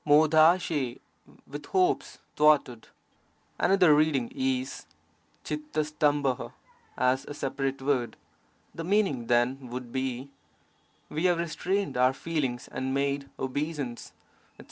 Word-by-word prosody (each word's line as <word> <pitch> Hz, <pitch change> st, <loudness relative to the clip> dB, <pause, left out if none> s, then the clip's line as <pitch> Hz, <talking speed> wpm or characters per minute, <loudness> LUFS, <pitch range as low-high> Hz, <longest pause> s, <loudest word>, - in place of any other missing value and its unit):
hN^I 155 Hz, -2 st, +4 dB, 0.3 s
— -, -, -23 dB
with 145 Hz, +1 st, -8 dB
hopes 370 Hz, +1 st, +1 dB, 0.2 s
thwarted. 150 Hz, -6 st, +3 dB, 0.7 s
Another 180 Hz, -4 st, +5 dB
reading 155 Hz, -, +2 dB
is 265 Hz, -1 st, -2 dB, 0.6 s
f=M*d* 300 Hz, -, -3 dB, 0.6 s
*T: 130 Hz, -3 st, -1 dB, 0.5 s
as 130 Hz, +1 st, +2 dB
a 145 Hz, -, -7 dB
separate 135 Hz, -1 st, -3 dB
word. 130 Hz, -4 st, 0 dB, 0.6 s
The 165 Hz, -, -6 dB
meaning 175 Hz, -, +1 dB
then 120 Hz, +2 st, +2 dB
would 125 Hz, 0 st, -6 dB
be: 130 Hz, +1 st, -3 dB, 0.8 s
'We 155 Hz, +4 st, -1 dB
have 175 Hz, -2 st, +4 dB
restrained 180 Hz, +2 st, -2 dB
our 130 Hz, +1 st, +4 dB
feelings 135 Hz, -5 st, -3 dB
and 130 Hz, +1 st, -3 dB
made 140 Hz, 0 st, -1 dB
obeisance/ 140 Hz, -2 st, -4 dB, 0.5 s
etc. -, -, -36 dB
145 Hz, 115 wpm, -28 LUFS, 130-165 Hz, 0.8 s, Another